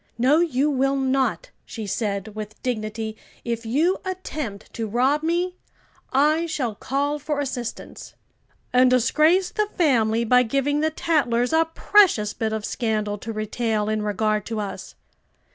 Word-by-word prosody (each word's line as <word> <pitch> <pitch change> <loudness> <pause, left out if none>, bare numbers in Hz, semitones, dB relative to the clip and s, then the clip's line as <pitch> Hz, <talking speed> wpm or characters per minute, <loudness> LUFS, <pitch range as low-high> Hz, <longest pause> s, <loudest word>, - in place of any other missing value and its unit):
"No, 265 +6 +4
you 295 -5 +1
will 270 0 +1
not," 270 - 0
she 220 -3 -7
said, 200 0 -2
with 215 0 -8
dignity. 220 -2 -3 0.3
"If 230 -1 -3
you 320 - +2
attempt 305 - -6
to 225 -1 -3
rob 260 +7 +2
me, 350 +3 -1 0.5
I 305 +5 +3
shall 265 -8 -2
call 285 +7 -2
for 295 0 -2
assistance." 255 -4 -5 0.6
"And 250 0 +6
disgrace 305 +9 +3
the 425 0 0
family 235 - +2
by 250 +2 +5
giving 275 +4 0
the 315 +1 +2
tattlers 280 -6 0
a 325 0 +4
precious 330 - +4
bit 220 -1 -2
of 220 -1 -3
scandal 215 -3 -2
to 225 - -6
retail 215 0 -1
in 215 0 0
regard 210 0 0
to 225 -2 -3
us." 195 -2 -6
250 Hz, 145 wpm, -23 LUFS, 220-300 Hz, 0.6 s, And